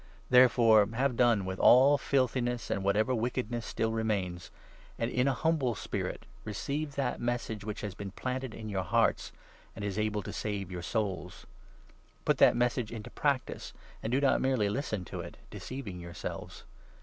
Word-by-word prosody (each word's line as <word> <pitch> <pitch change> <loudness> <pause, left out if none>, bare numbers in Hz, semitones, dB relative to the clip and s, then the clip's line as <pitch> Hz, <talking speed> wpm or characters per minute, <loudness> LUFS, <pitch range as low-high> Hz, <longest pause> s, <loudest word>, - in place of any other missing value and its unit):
Therefore, 115 -4 +6
have 130 0 +1
done 115 -5 +3
with 95 0 -4
all 135 +4 +7
21 - - +1
filthiness 125 -3 0
and 100 - -1
whatever 105 +6 +2
wickedness 120 -1 -2
still 110 0 -1
remains, 100 -6 -2 0.5
and 115 +1 -1
in 125 +2 +2
a 135 - +3
humble 145 -7 +1
spirit - - -4 0.2
receive 140 +8 -3
that 135 -3 -1
Message 120 -3 -2
which 105 0 -5
has 105 -2 -4
been 100 +1 -6
planted 130 +4 -4
in 110 - -7
your 100 -3 -1
hearts 85 - +1 0.4
and 105 - -5
is 100 +1 -2
able 105 -1 0
to - - -6
save 100 -3 -3
your 90 -1 -5
souls. 100 +1 -3 0.8
Put - - +2
that - - +7
22 - - -3
Message 120 -2 0
into 115 +1 -7
practice, 140 -3 -1 0.3
and 110 - -3
do 130 - +3
not 140 -1 +3
merely 130 -6 +2
listen 110 -5 -2
to - - -6
it - - -8
— - - -24
deceiving 120 -9 -6
yourselves. 85 -2 -7
115 Hz, 175 wpm, -30 LUFS, 100-130 Hz, 0.8 s, all